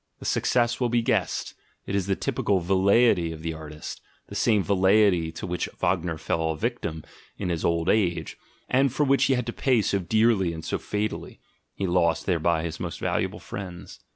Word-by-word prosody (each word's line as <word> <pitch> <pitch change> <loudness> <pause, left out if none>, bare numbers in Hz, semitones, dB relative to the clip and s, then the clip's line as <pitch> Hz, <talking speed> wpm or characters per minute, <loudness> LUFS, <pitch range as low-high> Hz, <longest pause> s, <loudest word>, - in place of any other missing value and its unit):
The - - -11
success 120 -1 +1
will 125 -2 +1
be 120 0 +1
guessed - - 0 0.2
— - - -42
it - - -5
is 100 -2 0
the 100 - +1
typical 95 0 0
velleity 95 0 +3
of 80 -1 -9
the 80 -1 -2
artist; 75 -1 -8 0.3
the - - -9
same 105 -4 +3
velleity 95 -3 +3
to - - -5
which 90 0 -2
Wagner 85 -2 0
fell 80 +1 -1
a 80 - -2
victim 85 -9 -3 0.3
in - - -3
his 85 -3 -2
old 85 -1 +1
age, 85 -6 +1 0.3
and 135 +1 +3
for 150 - +1
which 140 -1 +3
he 135 - +3
had 125 -1 -1
to 120 - -4
pay 130 -4 +2
so 100 - +1
dearly 105 -2 +2
and 80 -1 -7
so - - -2
fatally 105 +1 -4 0.4
(he 100 - -2
lost 85 -2 +1
thereby 85 -2 +1
his 85 -2 -5
most - - -5
valuable - - -1
friends). 90 -3 -8
95 Hz, 195 wpm, -26 LUFS, 85-110 Hz, 0.4 s, velleity